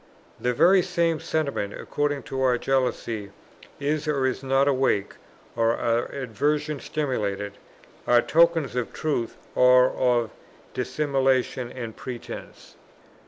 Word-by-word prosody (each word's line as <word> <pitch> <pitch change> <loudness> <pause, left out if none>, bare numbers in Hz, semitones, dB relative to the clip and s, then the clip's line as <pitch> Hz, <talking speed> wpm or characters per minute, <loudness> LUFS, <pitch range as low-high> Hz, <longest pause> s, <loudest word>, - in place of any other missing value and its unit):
The 125 - 0
very 180 +10 +5
same 170 -3 0
sentiments, 140 -12 -2
according 145 -1 -2
as - - -10
our 130 -2 +2
jealousy 120 -6 -1 0.5
is 150 +2 -1
or 140 -3 +1
is 130 0 -1
not 135 +1 +2
awake, 130 -7 +1 0.4
or 115 0 +2
our 115 0 +1
aversion 145 +4 -2
stimulated, 105 -10 -3 0.5
are 120 0 +5
tokens 165 -5 +3
of 125 -1 -2
truth 140 -7 -2 0.2
or 125 0 +6
of 120 -3 +1 0.4
dissimulation 130 -2 0
and 115 -4 -7
pretence. 125 -2 -9
130 Hz, 120 wpm, -25 LUFS, 120-145 Hz, 0.5 s, or